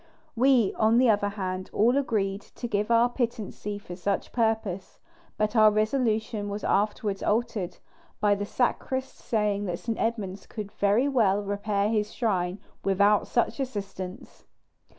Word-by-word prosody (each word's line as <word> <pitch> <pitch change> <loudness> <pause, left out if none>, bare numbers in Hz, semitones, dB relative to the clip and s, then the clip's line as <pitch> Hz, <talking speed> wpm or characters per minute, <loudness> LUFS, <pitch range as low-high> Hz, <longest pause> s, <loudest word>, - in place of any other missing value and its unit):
We, 245 -4 +4
on 220 +1 +4
the 245 -2 +6
other 205 -1 +1
hand, 185 -2 -4
all 235 +5 +3
agreed 205 -7 0
to 240 - -8
give 210 -1 -1
our 235 +1 +5
pittancy 230 -4 -3
for 180 -3 -9
such 195 +2 -2
purpose; 220 -5 -1 0.4
but 215 +2 0
our 215 -1 +7
resolution 215 -1 0
was 205 +1 -5
afterwards 205 0 0
altered, 210 -4 -1 0.4
by 205 -1 +3
the 205 0 -3
sacrist 260 +2 -1
saying 210 -2 0
that 175 -1 -2
St. 230 +3 -4
Edmund 200 -4 -2
could 210 -3 -6
very 205 +7 +2
well 210 -7 +2
repair 205 0 0
his 215 -1 0
shrine 185 -6 0 0.3
without 200 +1 +3
such 240 +3 0
assistance. 195 -6 -6
210 Hz, 145 wpm, -27 LUFS, 200-230 Hz, 0.4 s, our